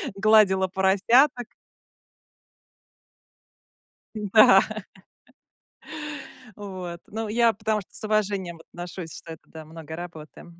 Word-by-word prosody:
гладила 195 -2 +4
поросяток. 215 +8 +2 2.7
М-да. 210 -2 +6 2.0
Вот. 185 -4 -7
Ну, 220 0 -5
я 230 +1 +3
потому 215 +1 -2
что 185 - -16
с - - -11
уважением 200 -5 -1
отношусь, 175 -1 -8
что 165 - -10
это, - - -13
да, 160 -1 -11
много 160 0 -10
работы. 165 -3 -10
190 Hz, 90 wpm, -24 LUFS, 175-215 Hz, 2.7 s, М-да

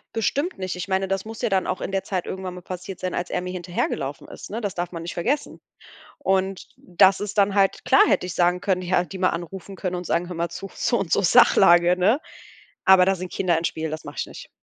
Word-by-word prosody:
Bestimmt 285 - -1
nicht 185 -1 -4
ich 180 +2 -5
meine, 190 0 0
das 195 0 -1
muss 225 0 -8
ja 235 - +1
dann 190 -1 +1
auch - - -3
in - - -4
der 195 0 -1
Zeit 185 -3 -3
irgendwann 190 -1 -5
mal 180 - -9
passiert 185 +1 -7
sein, 185 -1 -3
als 175 - -3
er - - -1
mir 180 0 -5
hinterhergelaufen 175 -6 -3
ist, - - -10
ne? 225 +4 -4
Das 205 -3 -3
darf 175 0 -4
man 170 -2 -6
nicht 170 - -5
vergessen. 260 - -2 0.6
Und 195 - -1
das 190 +2 +3
ist 205 0 -5
dann 200 0 +3
halt 195 -1 +1
klar - - +5
hätte - - +2
ich 180 - -5
sagen 180 0 +2
können, 185 -2 0
er 180 0 +1
hätte 175 -3 -3
die 190 - -7
mal 185 - +3
anrufen 180 +3 -6
können 185 -1 -3
und 180 0 -5
sagen: 170 +1 0
„Hör 180 - -6
mal 170 0 -2
zu, 195 +2 -8
so 240 - 0
und 170 -4 -3
so - - +3
Sachlage", 175 0 +6
ne? 210 +10 +3 0.7
Aber 190 -1 +7
da 195 - +2
sind 185 0 -7
Kinder 175 -3 +1
im 165 - -1
Spiel, 160 -1 -3
das 155 +1 -6
mache - - -9
ich - - -1
nicht. - - -11
185 Hz, 260 wpm, -23 LUFS, 175-195 Hz, 0.7 s, Aber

